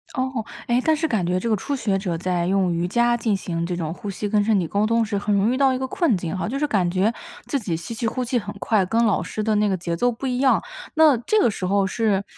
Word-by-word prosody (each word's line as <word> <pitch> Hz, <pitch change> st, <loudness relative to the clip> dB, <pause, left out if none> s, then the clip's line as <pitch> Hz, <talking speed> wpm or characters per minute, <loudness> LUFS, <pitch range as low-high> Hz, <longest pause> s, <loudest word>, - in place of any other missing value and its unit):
哦， 260 Hz, -4 st, -2 dB, 0.2 s
诶， 240 Hz, +1 st, +2 dB
但 315 Hz, -, +4 dB
是 320 Hz, +1 st, -1 dB
感 215 Hz, -, 0 dB
觉 180 Hz, +1 st, 0 dB
这 230 Hz, -, -2 dB
个 215 Hz, -, +3 dB
初 285 Hz, +8 st, -3 dB
学 210 Hz, -7 st, 0 dB
者 180 Hz, -4 st, -2 dB
在 175 Hz, 0 st, -1 dB
用 185 Hz, -2 st, +2 dB
瑜 170 Hz, +1 st, -1 dB
伽 240 Hz, +4 st, +2 dB
进 220 Hz, -3 st, 0 dB
行 170 Hz, -3 st, -3 dB
这 175 Hz, +1 st, -3 dB
种 165 Hz, -2 st, -3 dB
呼 205 Hz, -, -7 dB
吸 200 Hz, +2 st, -3 dB
跟 210 Hz, 0 st, +3 dB
身 215 Hz, 0 st, +2 dB
体 180 Hz, -, 0 dB
沟 200 Hz, +6 st, 0 dB
通 230 Hz, +1 st, +2 dB
时 215 Hz, -2 st, -2 dB
很 205 Hz, +1 st, 0 dB
容 200 Hz, +3 st, +2 dB
易 -, -, +1 dB
遇 -, -, -1 dB
到 270 Hz, -1 st, +3 dB
一 -, -, -1 dB
个 260 Hz, -, -2 dB
困 295 Hz, -, +1 dB
境 175 Hz, 0 st, -3 dB
哈， -, -, -2 dB
就 265 Hz, -, -3 dB
是 295 Hz, -, +1 dB
感 195 Hz, -10 st, +1 dB
觉 190 Hz, +6 st, +1 dB, 0.3 s
自 280 Hz, -, -1 dB
己 190 Hz, -8 st, -2 dB
吸 170 Hz, +8 st, -6 dB
气 230 Hz, +1 st, -2 dB
呼 255 Hz, +3 st, -2 dB
气 245 Hz, 0 st, 0 dB
很 205 Hz, -, -7 dB
快， 205 Hz, -3 st, +2 dB
跟 225 Hz, +5 st, +1 dB
老 210 Hz, -4 st, +2 dB
师 215 Hz, +4 st, -4 dB
的 220 Hz, 0 st, +1 dB
那 210 Hz, 0 st, +2 dB
个 195 Hz, -, +1 dB
节 170 Hz, -1 st, -3 dB
奏 245 Hz, -, +2 dB
不 235 Hz, +4 st, -7 dB
一 250 Hz, -1 st, -1 dB
样， 265 Hz, -1 st, +3 dB, 0.3 s
那 310 Hz, -4 st, +6 dB
这 245 Hz, -, +1 dB
个 235 Hz, -, +3 dB
时 185 Hz, -, -4 dB
候 195 Hz, +1 st, +2 dB
是 200 Hz, 0 st, 0 dB
210 Hz, 320 characters per minute, -23 LUFS, 185-240 Hz, 0.3 s, 那